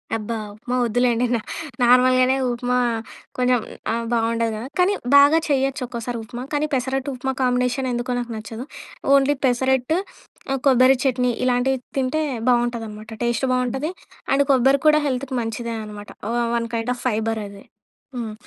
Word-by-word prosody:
అబ్బా! 225 +1 -3 0.2
ఉప్మా 245 +4 -4
వద్దులెండి. 245 +1 +2
నా - - 0 0.4
నార్మల్‌గానే 255 +1 +5 0.2
ఉప్మా 245 +1 -1 0.6
కొంచెం 250 -1 +3 0.3
ఆహ్, 230 0 -2
బావుండదు 230 0 +1
గదా! 230 +4 -6
కానీ 375 +3 +4 0.2
బాగా 285 +3 +7
చెయ్యొచ్చు, 270 0 +1
ఒక్కోసారి 235 0 -5
ఉప్మా. 240 +2 -7
కానీ 295 +1 +1
పెసరట్టుప్మా 265 0 -1
కాంబినేషన్ 250 +1 +1
ఎందుకో 240 +1 -2
నాకు 240 -1 -5
నచ్చదు. 225 +3 -7 0.5
ఓన్లి 280 +1 +4
పెసరట్టు 260 +4 +2 0.5
ఆహ్, 270 - 0
కొబ్బరి 260 0 +6
చట్నీ 250 -2 +1
ఇలాంటివి 255 +1 +2 0.2
తింటే 270 +4 0 0.3
బావుంటాదనమాట. 230 -3 -1
టేస్టు 240 +2 0
బావుంటది. 260 +6 -1 0.4
అండ్ 280 +1 +3
కొబ్బరి 270 +1 +4
కూడా 305 0 +6
హెల్త్‌కి 260 0 -2
మంచిదే 230 +1 -4
అనమాట. 210 -1 -9 0.2
వ - - -1 0.2
వన్ 230 0 -1
కైండ్ 230 +2 -1
ఆఫ్ - - -11
ఫైబరది. 215 -3 -2 0.5
హ్మ్. 225 -3 -4
250 Hz, 140 wpm, -22 LUFS, 230-265 Hz, 0.6 s, బాగా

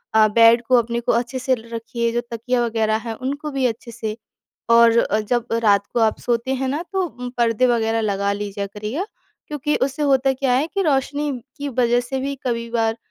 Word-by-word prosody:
अ, 215 -1 +6
bed 230 0 +7
को, 255 - +4
अपने 235 0 0
को, 235 - 0
अच्छे 240 +3 -1
से 255 +1 +1
ल, 230 -1 -13
रखिए। 230 0 -2
जो 240 - 0
तकिया 240 +1 0
वगैरह 220 -1 +1
हैं, 225 - -2
उनको 285 +5 -4
भी 270 -2 0
अच्छे 235 0 -6
से। 220 -2 -4 0.5
और 230 -2 +5
जब 240 -1 0 0.2
रात 200 -2 +3
को - - +1
आप 220 -1 +2
सोते 240 +2 -1
हैं 265 0 -2
ना, 295 +5 -2
तो 380 -1 +1
उम 250 -4 -7
पर्दे 235 +1 +2
वगैरह 225 -2 +1
लगा 200 -1 0
लीजिया 200 0 -4
करिए। 210 - -4 0.4
क्योंकि 295 0 -1
उससे 275 +3 -2
होता 270 -1 +3
क्या 265 -1 0
है 270 +5 +2
कि 395 - +2
रोशनी 290 -1 0 0.3
की 285 0 -4
वज़ह 245 -1 +2
से 265 +2 -4
भी 280 +1 -3
कभी 235 -1 -2
बार 225 -1 0
240 Hz, 205 wpm, -21 LUFS, 225-265 Hz, 0.5 s, bed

